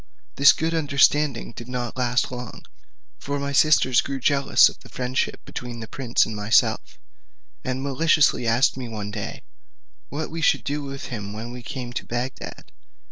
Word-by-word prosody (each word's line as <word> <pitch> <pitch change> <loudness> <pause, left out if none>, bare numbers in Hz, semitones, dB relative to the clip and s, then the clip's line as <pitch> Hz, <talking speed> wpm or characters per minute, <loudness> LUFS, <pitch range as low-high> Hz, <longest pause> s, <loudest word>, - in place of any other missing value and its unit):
this 140 - +8
good 165 +1 -1
understanding 145 -4 +2
did 120 0 -10
not 125 -2 -4
last 125 0 0
long, 125 -2 -8 0.5
for 145 0 -3
my 140 0 -3
sisters 140 -3 +4
grew 135 -1 -4
jealous 140 +2 +5
of - - -7
the - - -16
friendship 130 +1 -2
between 120 -1 -7
the 110 - -7
prince 125 -1 +1
and 110 - -6
myself, 105 +2 +1 0.7
and 130 +1 -3
maliciously 145 -2 +2
asked 115 +3 +3
me 130 -2 -6
one 105 -2 -5
day, 105 -1 -6 0.7
what 155 +2 -4
we 165 0 -4
should - - +3
do 145 +1 -2
with 135 0 -7
him 100 -2 -5
when 115 +3 -6
we 125 0 -8
came 120 +1 -6
to - - -3
Bagdad? 120 +2 -5
130 Hz, 170 wpm, -24 LUFS, 120-140 Hz, 0.7 s, this